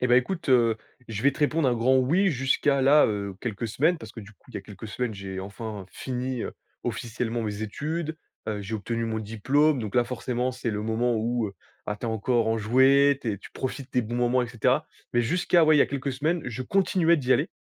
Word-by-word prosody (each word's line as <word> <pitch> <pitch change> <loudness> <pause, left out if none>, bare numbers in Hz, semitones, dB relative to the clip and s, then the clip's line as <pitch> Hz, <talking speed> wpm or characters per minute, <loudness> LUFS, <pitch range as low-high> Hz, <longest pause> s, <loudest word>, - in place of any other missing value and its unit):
Et 125 - +2
bah, 120 - +5
écoute, 165 +5 0
heu, 115 -3 +4 0.3
je 110 0 -4
vais 140 0 +4
te - - -12
répondre 150 -1 +2
un 120 - +2
grand 125 +3 +3
oui 165 +10 +3
jusqu'à 135 +1 +1
là, 145 +3 +6
heu, 100 -2 -3
quelques 115 -1 -3
semaines. 155 +10 +2
Parce 110 -2 -10
que 115 - -8
du 105 +1 -13
coup, - - -22
il - - -19
y - - -2
a - - -8
quelques 105 +2 -10
semaines, 120 0 -3
j'ai 95 -1 -6
enfin, 100 0 -7
fini, 125 -1 -3
heu, - - -4 0.3
officiellement 120 0 -3
mes 105 0 -3
études. 155 +8 -3 0.3
Heu, 105 -1 -2
j'ai 105 +3 -5
obtenu 115 +2 -2
mon 110 -1 -2
diplôme. 135 +8 +2
Donc 110 -3 -5
là, 120 -1 +4
forcément, 125 +1 -2
c'est 120 -2 -3
le 105 0 -3
moment 115 +2 0
où, 115 0 0
heu, 100 - -13 0.3
bah, 105 - -2
tu 120 - -4
es - - -1
encore 110 +1 +1
enjoué, 130 +5 +4
tu 115 -4 -1
es 100 - -5
tu - - -13
profites 130 0 -5
des 125 - +2
bons 115 +2 -4
moments 125 +1 +2
et - - -2
cetera. 120 -3 +1 0.3
Mais 120 - +4
jusqu'à, 175 +5 +3
ouais, 155 0 +5
il - - +5
y - - +7
a - - +1
quelques 140 0 -3
semaines, 155 +6 0
je 125 +1 -4
continuais 180 0 +3
d'y 130 -3 +1
aller. 145 +6 +2
120 Hz, 240 wpm, -26 LUFS, 110-140 Hz, 0.3 s, y